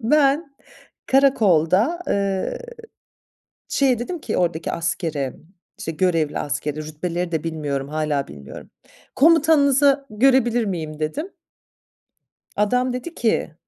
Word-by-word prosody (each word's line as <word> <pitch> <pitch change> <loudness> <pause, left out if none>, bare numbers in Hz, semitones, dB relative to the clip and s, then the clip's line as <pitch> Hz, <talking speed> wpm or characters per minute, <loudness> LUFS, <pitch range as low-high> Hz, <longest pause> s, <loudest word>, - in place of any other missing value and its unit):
ben 280 +3 +2 0.5
karakolda, 230 - +3
ııı, 195 -1 -1 1.1
şeye 260 -4 +2
dedim 340 +8 -4
ki - - -3
oradaki 170 -2 -1
askere, 160 -5 -2 0.4
işte 165 - -4
görevli 165 -2 0
askere, 145 +1 -3
rütbeleri 170 +3 -4
de 160 -2 -1
bilmiyorum, 145 -4 -3
hâlâ 150 -2 -1
bilmiyorum. 70 -1 -11 0.5
Komutanınızı 285 -3 +4
görebilir 240 0 +3
miyim 160 -6 -4
dedim. 290 - -3 1.3
Adam 250 +5 +1
dedi 290 +7 -6
ki, 220 -8 0
195 Hz, 100 wpm, -22 LUFS, -, 1.3 s, Komutanınızı